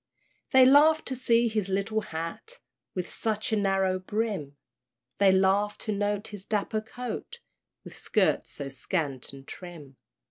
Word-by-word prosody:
They 260 Hz, -1 st, +7 dB
laughed 300 Hz, +4 st, +6 dB
to 260 Hz, -, -2 dB
see 235 Hz, -2 st, +3 dB
his 215 Hz, -4 st, -1 dB
little 200 Hz, +3 st, 0 dB
hat, 165 Hz, -, -5 dB, 0.4 s
With 180 Hz, -1 st, -2 dB
such 220 Hz, 0 st, -2 dB
a -, -, +5 dB
narrow 195 Hz, -2 st, +1 dB
brim; 190 Hz, -8 st, -3 dB, 0.6 s
They 200 Hz, -1 st, +6 dB
laughed 195 Hz, +2 st, +2 dB
to 215 Hz, -, -2 dB
note 205 Hz, 0 st, -1 dB
his 205 Hz, -3 st, -8 dB
dapper 215 Hz, +1 st, -1 dB
coat, 250 Hz, -, -7 dB, 0.4 s
With -, -, -11 dB
skirts -, -, +1 dB
so 140 Hz, -1 st, -5 dB
scant 135 Hz, 0 st, -3 dB
and 135 Hz, 0 st, -13 dB
trim. 160 Hz, -7 st, -10 dB
200 Hz, 145 wpm, -28 LUFS, 180-225 Hz, 0.6 s, They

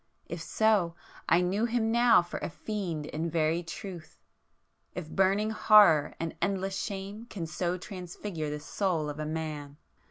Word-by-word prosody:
If 170 Hz, 0 st, -6 dB
so, 200 Hz, -3 st, +2 dB, 0.3 s
I 170 Hz, -, +5 dB
knew 195 Hz, +5 st, +1 dB
him 230 Hz, -1 st, 0 dB
now 235 Hz, -4 st, +5 dB
for 175 Hz, -, -6 dB
a -, -, -3 dB
fiend 175 Hz, -5 st, -4 dB
in 160 Hz, +3 st, -3 dB
very 165 Hz, +1 st, +1 dB
truth!—if 175 Hz, -1 st, -11 dB
burning 195 Hz, +3 st, +2 dB
horror 205 Hz, -9 st, +6 dB
and 165 Hz, -1 st, -3 dB
endless 195 Hz, -1 st, 0 dB
shame 200 Hz, +2 st, -5 dB
can 180 Hz, -8 st, -5 dB
so 175 Hz, +2 st, -2 dB
transfigure 180 Hz, -3 st, -6 dB
the 150 Hz, 0 st, -4 dB
soul 160 Hz, -1 st, -1 dB
of 145 Hz, -, -9 dB
man! 155 Hz, -2 st, -4 dB
180 Hz, 140 wpm, -29 LUFS, 160-205 Hz, 0.3 s, horror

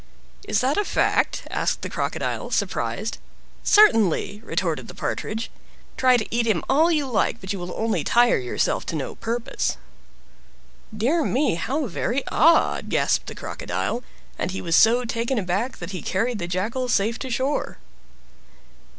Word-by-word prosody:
"Is 210 Hz, -, +1 dB
that 265 Hz, +3 st, +1 dB
a 415 Hz, -, +3 dB
fact?" -, -, +1 dB
asked -, -, -1 dB
the -, -, -2 dB
Crocodile, -, -, -3 dB
surprised. -, -, -2 dB, 0.4 s
"Certainly!" 220 Hz, -, +4 dB
retorted -, -, -2 dB
the -, -, -10 dB
Partridge. 220 Hz, +1 st, -3 dB, 0.4 s
Try 255 Hz, -1 st, +4 dB
to 220 Hz, -, -2 dB
eat 235 Hz, 0 st, +1 dB
him 205 Hz, -7 st, +1 dB
if 320 Hz, +5 st, +4 dB
you 295 Hz, -2 st, 0 dB
like, 240 Hz, -5 st, 0 dB
but 190 Hz, +1 st, -4 dB
you 195 Hz, -, -5 dB
will 175 Hz, 0 st, -5 dB
only 225 Hz, 0 st, 0 dB
tire 240 Hz, 0 st, +4 dB
yourself 125 Hz, -1 st, -1 dB
to -, -, -3 dB
no 145 Hz, -, -3 dB
purpose. 235 Hz, +1 st, -2 dB, 1.2 s
"Dear 290 Hz, +10 st, +2 dB
me! 280 Hz, +2 st, +1 dB
how 270 Hz, -, -1 dB
very 245 Hz, +5 st, -2 dB
odd!" 330 Hz, +5 st, +3 dB
gasped -, -, +1 dB
time -, -, -7 dB
Crocodile; 240 Hz, -, -3 dB, 0.4 s
and -, -, -1 dB
he 190 Hz, -, -4 dB
was 165 Hz, -2 st, 0 dB
so 240 Hz, +3 st, +5 dB
taken 235 Hz, +2 st, -1 dB
aback 205 Hz, +6 st, -1 dB
that 175 Hz, +1 st, -7 dB
he 185 Hz, -4 st, -5 dB
carried 225 Hz, +4 st, -1 dB
the 175 Hz, -, -3 dB
Jackal 220 Hz, +8 st, -2 dB
safe 225 Hz, +1 st, +1 dB
to 260 Hz, -, -5 dB
shore. 260 Hz, +4 st, -1 dB
230 Hz, 160 wpm, -23 LUFS, 195-260 Hz, 1.2 s, so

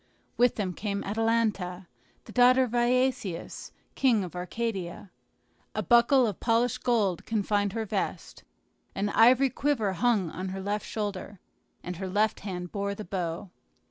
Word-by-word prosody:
With 245 Hz, 0 st, +3 dB
them 190 Hz, -4 st, -2 dB
came 200 Hz, +1 st, -3 dB
Atalanta, 210 Hz, -4 st, 0 dB, 0.4 s
the -, -, -11 dB
daughter 250 Hz, +1 st, +5 dB
of 250 Hz, -, -3 dB
Iasius, 245 Hz, -6 st, 0 dB, 0.2 s
king 235 Hz, -7 st, +2 dB
of 180 Hz, -1 st, -8 dB
Arcadia. 185 Hz, -1 st, -4 dB, 0.6 s
A -, -, -1 dB
buckle 240 Hz, +2 st, +5 dB
of 210 Hz, -5 st, -3 dB
polished 230 Hz, +1 st, +1 dB
gold 210 Hz, -8 st, +1 dB
confined 205 Hz, -2 st, 0 dB
her 225 Hz, -1 st, -2 dB
vest, 200 Hz, -2 st, -4 dB, 0.5 s
an 200 Hz, +1 st, -1 dB
ivory 250 Hz, +5 st, +5 dB
quiver 255 Hz, -9 st, 0 dB
hung 205 Hz, -5 st, +1 dB
on 185 Hz, +2 st, -5 dB
her 190 Hz, +1 st, -5 dB
left 205 Hz, +2 st, -3 dB
shoulder, 205 Hz, -2 st, -4 dB, 0.4 s
and 180 Hz, -1 st, -5 dB
her 190 Hz, +1 st, -4 dB
left 210 Hz, +3 st, +1 dB
hand 180 Hz, -3 st, -6 dB
bore 200 Hz, 0 st, -2 dB
the 215 Hz, -, -7 dB
bow. 175 Hz, +1 st, -4 dB
210 Hz, 145 wpm, -28 LUFS, 190-235 Hz, 0.6 s, daughter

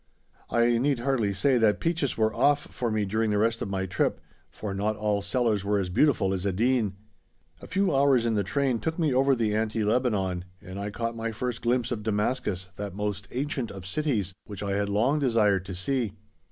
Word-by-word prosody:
I 120 Hz, 0 st, +3 dB
need 140 Hz, +1 st, +2 dB
hardly 120 Hz, -6 st, +1 dB
say 120 Hz, +7 st, +2 dB
that 110 Hz, -2 st, +3 dB
peaches 165 Hz, -5 st, 0 dB
were 110 Hz, 0 st, +2 dB
"off" 145 Hz, 0 st, +3 dB
for 120 Hz, -, -2 dB
me 110 Hz, -1 st, 0 dB
during 110 Hz, +3 st, 0 dB
the 105 Hz, -, +1 dB
rest 115 Hz, +2 st, +1 dB
of -, -, -3 dB
my 95 Hz, -1 st, -1 dB
trip, 90 Hz, 0 st, 0 dB, 0.3 s
for 105 Hz, -2 st, -5 dB
not 105 Hz, +2 st, -1 dB
all 105 Hz, -1 st, 0 dB
sellers 105 Hz, -1 st, 0 dB
were 105 Hz, +1 st, +1 dB
as 95 Hz, -2 st, -1 dB
beautiful 95 Hz, -2 st, +2 dB
as 95 Hz, -1 st, -2 dB
Edeen! 105 Hz, +2 st, +1 dB, 0.7 s
A -, -, -10 dB
few 195 Hz, -4 st, +1 dB
hours 135 Hz, -3 st, +4 dB
in 115 Hz, -, +1 dB
the 105 Hz, -2 st, +1 dB
train 130 Hz, +3 st, 0 dB
took 160 Hz, +5 st, -2 dB
me 155 Hz, -6 st, +1 dB
over 135 Hz, +1 st, +4 dB
the 110 Hz, -3 st, 0 dB
Anti 110 Hz, 0 st, 0 dB
Lebanon, 105 Hz, -6 st, 0 dB
and 95 Hz, -1 st, -8 dB
I 100 Hz, +1 st, -3 dB
caught 115 Hz, +2 st, -3 dB
my 115 Hz, 0 st, -3 dB
first 120 Hz, +1 st, -3 dB
glimpse 120 Hz, 0 st, +1 dB
of 115 Hz, -3 st, -2 dB
Damascus, 105 Hz, -3 st, -1 dB
that 100 Hz, -2 st, -5 dB
most 100 Hz, -1 st, -3 dB
ancient 135 Hz, -1 st, -2 dB
of 95 Hz, -2 st, -9 dB
cities, 105 Hz, -, -1 dB
which 100 Hz, -2 st, -6 dB
I 100 Hz, -, -2 dB
had 100 Hz, +1 st, 0 dB
long 120 Hz, +9 st, +2 dB
desired 105 Hz, -8 st, +2 dB
to 95 Hz, -1 st, -6 dB
see. 115 Hz, +2 st, -1 dB
110 Hz, 205 wpm, -27 LUFS, 100-125 Hz, 0.7 s, hours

